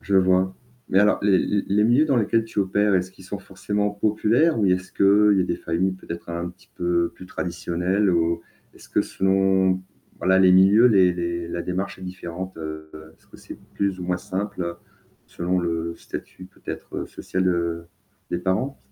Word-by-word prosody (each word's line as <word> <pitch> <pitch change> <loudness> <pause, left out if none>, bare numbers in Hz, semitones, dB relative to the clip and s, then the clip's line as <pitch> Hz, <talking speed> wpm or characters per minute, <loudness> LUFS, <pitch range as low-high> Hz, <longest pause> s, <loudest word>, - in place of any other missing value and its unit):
Je 100 0 0
vois. 95 0 +3 0.3
Mais 95 - +3
alors 105 +1 +4
les 100 -3 +5
les 100 +2 0
les 105 +2 +2
milieux 120 +7 +4
dans 140 -4 +1
lesquels 115 0 +2
tu 115 - -7
opères, 100 +1 +2
est-ce 90 0 0
qu'ils 95 - -16
sont 100 +2 -5
forcément 105 +2 -2
populaires? 110 +9 +2
Ou 105 - +2
est-ce 95 0 0
qu'il 100 +1 +4
y - - +4
a - - +2
des - - -2
familles, 90 +3 -1
peut-être 85 -2 -8
un 85 +1 -3
petit - - -24
peu 85 -1 0
plus 90 - -12
traditionnelles? 90 +3 -1
Ou 85 -1 +1 0.3
est-ce - - -16
que - - +1
selon, 95 -1 +2 0.4
voilà 95 +1 +3
les 95 -1 +6
milieux, 100 +6 +6
les 95 -6 +5
les 85 -1 -3
la 85 0 -3
démarche 95 +3 -3
est - - -12
différente, 90 0 -7
heu, 80 -1 -7 0.3
est-ce - - -29
que - - -16
c'est - - -11 0.2
plus 100 -2 -1
ou - - -4
moins 90 0 -1
simple 90 -2 -4 0.5
selon 90 +2 -2
le 85 -1 -2
statut, 95 - -9
peut-être 95 - -7
social, 95 0 -3
heu, 85 -1 -1 0.4
des 85 - -1
parents? 105 +10 -1
95 Hz, 185 wpm, -23 LUFS, 85-100 Hz, 0.5 s, les